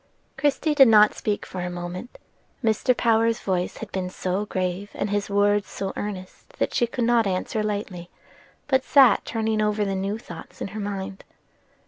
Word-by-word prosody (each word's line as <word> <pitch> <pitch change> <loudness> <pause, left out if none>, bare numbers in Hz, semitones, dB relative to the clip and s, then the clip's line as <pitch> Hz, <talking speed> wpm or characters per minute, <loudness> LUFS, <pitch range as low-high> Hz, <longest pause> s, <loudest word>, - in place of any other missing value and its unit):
Christie 295 +1 +1
did 275 -3 +7
not 210 -2 +6
speak 210 -1 -2
for 185 - -6
a 180 - -3
moment: 175 +6 -7 0.5
Mr. 230 +3 +2
Power's 230 0 +2
voice 180 -2 -2
had 220 - -8
been 185 -1 -3
so 185 +3 -2
grave, 185 +1 -2
and 205 - -2
his 205 0 -1
words 205 0 +2
so 195 -1 -4
earnest 200 - -7
that - - -1
she 240 - +2
could 240 +1 -3
not 235 -2 +3
answer 190 +3 -1
lightly, 200 -4 -4 0.6
but 265 -2 +2
sat 265 -7 +5
turning 220 -1 -1
over 210 0 +1
the 195 - -1
new 195 +2 -2
thoughts 225 - -11
in - - -4
her 215 +3 -7
mind. 195 -1 -5
205 Hz, 175 wpm, -24 LUFS, 190-225 Hz, 0.6 s, did